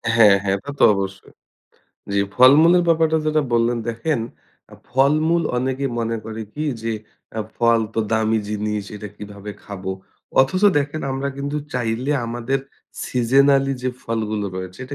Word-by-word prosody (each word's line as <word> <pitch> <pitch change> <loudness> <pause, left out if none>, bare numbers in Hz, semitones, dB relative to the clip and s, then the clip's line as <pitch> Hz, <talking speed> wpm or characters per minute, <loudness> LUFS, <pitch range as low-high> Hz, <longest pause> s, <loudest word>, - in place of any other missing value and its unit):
হ্যাঁ, 105 -4 +7
হ্যাঁ। 95 -1 +1
এটা 145 - -7
তো - - +4
অবশ্যই। 95 0 -5 0.8
জ্বি, 100 - +2 0.2
ফলমূলের 155 +8 +7
ব্যাপারটা 160 -1 +3
যেটা 155 0 +2
বললেন, 120 +1 +2
দেখেন 115 +4 -1 0.5
আ - - -10 0.2
ফলমূল 155 +6 +3
অনেকেই 130 +2 -1
মনে 115 0 -1
করে 110 0 -6
কি? 150 - -3 0.2
যে 115 0 -1 0.4
অ্যা 110 - -2
ফল 115 -1 +3
তো - - +1
দামি 110 0 +2
জিনিস, 105 0 -2
এটা 105 0 -7
কীভাবে 105 0 -8
খাবো? 95 -2 -6 0.5
অথচ, 135 +9 +1 0.2
দেখেন 145 +2 -2
আমরা 135 +1 -2
কিন্তু 140 +1 -3 0.2
চাইলে 125 +3 -1
আমাদের 120 +3 -1 0.5
সিজনাল 135 +3 +3
যে 130 - 0
ফলগুলো 110 -2 -2
রয়েছে, 95 0 -7
এটা 135 +3 -7
120 Hz, 150 wpm, -21 LUFS, 110-140 Hz, 0.8 s, হ্যাঁ